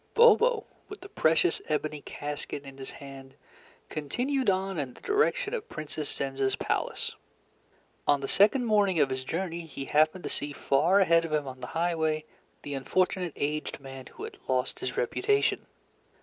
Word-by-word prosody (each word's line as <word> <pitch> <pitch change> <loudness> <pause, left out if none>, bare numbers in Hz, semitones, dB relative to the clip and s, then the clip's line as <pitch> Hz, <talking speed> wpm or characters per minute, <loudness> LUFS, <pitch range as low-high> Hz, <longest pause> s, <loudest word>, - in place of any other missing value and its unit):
Bobo, 470 -1 +6 0.2
with 410 - -9
the 390 - -10
precious 165 - +3
ebony 150 -1 -1
casket 145 -1 -5
in 135 -1 -11
his 135 - -5
hand, 135 -1 -10 0.5
continued 245 - -1
on 190 -2 0
in 130 -4 -4
the - - -16
direction 420 +2 +1
of 460 -4 -4
Princess 155 -1 -5
Zenza's 135 -1 -1
palace. - - -1 1.0
On 145 -1 +5
the 135 - -4
second 220 - +4
morning 205 -6 +3
of 140 -2 +3
his 130 0 -2
journey, 170 +3 -3
he 135 -2 -6
happened 155 +5 +3
to - - -3
see 145 0 -3
far 165 +9 +3
ahead 165 -2 +5
of 165 - -5
him 150 -2 0
on 130 -1 -7
the - - -6
highway 160 -2 +1 0.4
the 145 - -5
unfortunate 180 +4 0
aged 150 +1 -2
man 135 -1 -9
who - - -10
had - - -8
lost 130 -1 0
his 125 - -4
reputation. 415 - +1
155 Hz, 165 wpm, -29 LUFS, 140-195 Hz, 1.0 s, Bobo